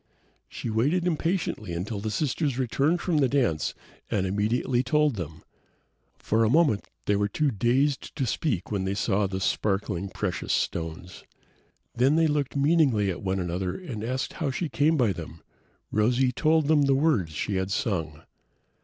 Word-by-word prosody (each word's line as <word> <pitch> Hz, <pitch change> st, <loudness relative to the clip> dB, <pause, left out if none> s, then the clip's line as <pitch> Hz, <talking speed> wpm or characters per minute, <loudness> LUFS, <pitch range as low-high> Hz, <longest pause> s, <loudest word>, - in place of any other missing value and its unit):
She 115 Hz, -, -5 dB
waited 145 Hz, +11 st, +1 dB
impatiently 165 Hz, -, -1 dB
until 100 Hz, +5 st, -3 dB
the 110 Hz, +2 st, -3 dB
sisters 140 Hz, +2 st, -1 dB
returned 140 Hz, +7 st, +1 dB
from 175 Hz, -4 st, 0 dB
the 135 Hz, -3 st, +3 dB
dance 120 Hz, -, 0 dB, 0.3 s
and 95 Hz, -2 st, 0 dB
immediately 110 Hz, +6 st, +1 dB
told 150 Hz, +1 st, +2 dB
them. 80 Hz, -4 st, -7 dB, 0.7 s
For 110 Hz, +1 st, +1 dB
a 110 Hz, -, +3 dB
moment 145 Hz, -7 st, +3 dB, 0.2 s
they 105 Hz, -, +2 dB
were 100 Hz, 0 st, +1 dB
too 145 Hz, +7 st, 0 dB
dazed 130 Hz, +6 st, 0 dB
to 135 Hz, -, -1 dB
speak 115 Hz, -, -2 dB
when 100 Hz, -3 st, -1 dB
they 95 Hz, +1 st, -1 dB
saw 100 Hz, -1 st, +1 dB
the 95 Hz, 0 st, -4 dB
sparkling 95 Hz, -1 st, -1 dB
precious 95 Hz, -1 st, -2 dB
stones. 85 Hz, +2 st, -3 dB, 0.7 s
Then 130 Hz, +5 st, +3 dB
they 165 Hz, 0 st, +4 dB
looked 145 Hz, -3 st, 0 dB
meaningly 140 Hz, -, +3 dB
at 90 Hz, -, -6 dB
one 95 Hz, 0 st, -1 dB
another 90 Hz, +1 st, -2 dB
and 130 Hz, -, -6 dB
asked 130 Hz, +3 st, -2 dB
how 160 Hz, -6 st, -2 dB
she 150 Hz, +5 st, -2 dB
came 155 Hz, +3 st, +2 dB
by 115 Hz, -7 st, +2 dB
them. 80 Hz, -1 st, -9 dB, 0.5 s
Rosy 125 Hz, +4 st, +2 dB
told 155 Hz, +3 st, +2 dB
them 155 Hz, -1 st, +4 dB
of 145 Hz, -, +4 dB
the 135 Hz, -, +4 dB
words 135 Hz, -, +1 dB
she 95 Hz, +6 st, -2 dB
had 95 Hz, 0 st, -1 dB
sung. 80 Hz, -, -2 dB
115 Hz, 170 wpm, -26 LUFS, 95-145 Hz, 0.7 s, they